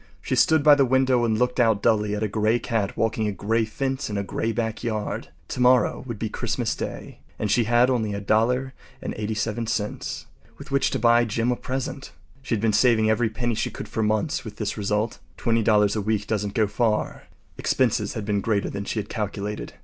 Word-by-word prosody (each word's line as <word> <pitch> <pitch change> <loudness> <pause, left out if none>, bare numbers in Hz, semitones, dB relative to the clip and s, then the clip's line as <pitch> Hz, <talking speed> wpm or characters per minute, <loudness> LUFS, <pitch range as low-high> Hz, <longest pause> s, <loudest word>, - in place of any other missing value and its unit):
She - - -2
stood 160 -2 +4
by 150 0 +8
the 140 -1 +5
window 130 -1 +3
and 110 -2 +1
looked 125 +2 0
out 110 -4 +3
dully 105 -2 +2
at 105 - -2
a - - +1
gray 110 +2 +1
cat 115 -5 -2
walking 110 -1 0
a - - 0
gray 110 +4 0
fence 135 +3 -3
in 105 - -3
a 100 - -1
gray 110 +3 -2
backyard. 110 -1 -3 0.2
Tomorrow 125 0 +3
would 120 -3 -5
be 110 - -2
Christmas - - -2
Day, - - -6 0.2
and 105 -2 -1
she 120 - +3
had 120 +2 +4
only 115 -5 0
$1.87 110 -1 -2 0.3
with 140 +1 -11
which 140 0 +2
to - - -1
buy 120 +1 +4
Jim 115 +2 0
a - - +1
present. 135 +2 -5 0.3
She 130 -3 -1
had 105 - -3
been 110 -2 +2
saving 110 0 +4
every 115 +1 +1
penny 120 +2 -2
she - - -1
could - - -8
for 110 - -3
months, 110 +6 0
with 110 -2 -8
this 105 -1 -3
result. 105 +2 -1 0.2
Twenty 115 0 +1
dollars 105 -2 +3
a 105 - 0
week 105 0 -1
doesn’t 105 -1 -2
go 110 - +3
far. 110 +1 -1 0.3
Expenses - - +1
had 110 - -4
been 100 -1 0
greater 105 -1 0
than 100 0 -5
she - - -3
had 105 -1 -2
calculated. 105 0 -4
110 Hz, 200 wpm, -24 LUFS, 105-120 Hz, 0.3 s, by